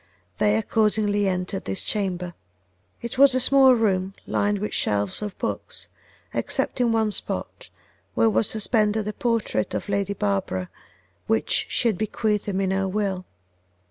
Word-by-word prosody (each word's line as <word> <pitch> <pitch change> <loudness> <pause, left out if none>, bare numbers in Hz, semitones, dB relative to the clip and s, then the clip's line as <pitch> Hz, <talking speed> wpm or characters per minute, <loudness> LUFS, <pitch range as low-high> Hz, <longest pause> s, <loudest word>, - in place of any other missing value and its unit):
They 105 +1 +3
accordingly 205 - +1
entered 185 +1 -2
his 195 - -1
chamber. 180 -4 0 0.7
It 235 +2 -5
was 275 -2 +7
a - - +3
small 265 0 +6
room 195 -4 0
lined 205 0 0
with 210 +2 -4
shelves 100 - 0
of 210 -2 -5
books, - - -4 0.4
except - - -1
in 240 -1 +3
one 220 -1 +1
spot, - - -4 0.5
where 225 - +4
was 220 -1 +2
suspended 215 -1 +1
a 210 - -2
portrait 230 - -1
of - - -4
Lady 200 0 0
Barbara, 95 - -2 0.6
which 110 - +1
she 240 - +1
had 210 -5 0
bequeathed 215 -1 -1
him 195 -1 -1
in 190 -1 0
her 190 0 0
will. 190 -2 -2
205 Hz, 150 wpm, -24 LUFS, 185-220 Hz, 0.7 s, was